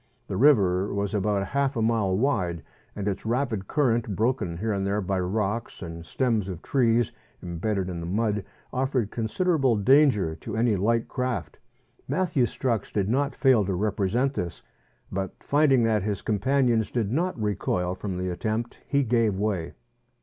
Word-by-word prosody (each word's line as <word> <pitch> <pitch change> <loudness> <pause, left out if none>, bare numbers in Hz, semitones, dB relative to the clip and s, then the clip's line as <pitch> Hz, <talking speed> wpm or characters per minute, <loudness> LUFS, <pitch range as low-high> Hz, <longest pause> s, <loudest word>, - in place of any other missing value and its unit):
The - - -4
river 100 -7 +4
was 100 0 -2
about 100 -1 0
half 140 0 0
a - - +1
mile 110 -5 +1
wide, 95 - 0 0.3
and 100 -1 -3
its 100 - -2
rapid 115 -4 -1
current, 120 -7 +1
broken 110 -7 0
here 110 +4 -1
and 100 -1 -1
there 100 +1 0
by 95 -1 -1
rocks 105 +4 -2
and 85 -1 -7
stems 110 0 0
of 90 -2 -7
trees 120 -3 +2 0.3
embedded 95 +3 -2
in 90 -2 -4
the 85 - -5
mud, 105 +1 0 0.3
offered 130 -4 0
consider 165 - 0
able 130 -5 +3
danger 110 - +4
to 110 +6 -6
any 115 -2 +3
light 115 +4 +1
craft. 120 - -3 0.5
Matthew 150 -3 +1
Strux 115 -3 -2
did 100 -1 0
not 140 +4 0
fail 130 -6 +4
to 95 -1 -1
represent 105 +6 0
this, 90 -9 -4 0.5
but 95 -1 -3
finding 140 -4 +3
that 110 -2 +2
his 100 0 -3
companions 115 +1 +1
did 110 -4 -1
not 170 +1 -1
recoil 95 -4 -1
from 95 0 -5
the 90 0 -2
attempt 110 +6 -3
he 140 -1 +2
gave 115 -5 +2
way. 100 -5 -2
110 Hz, 165 wpm, -26 LUFS, 95-125 Hz, 0.5 s, river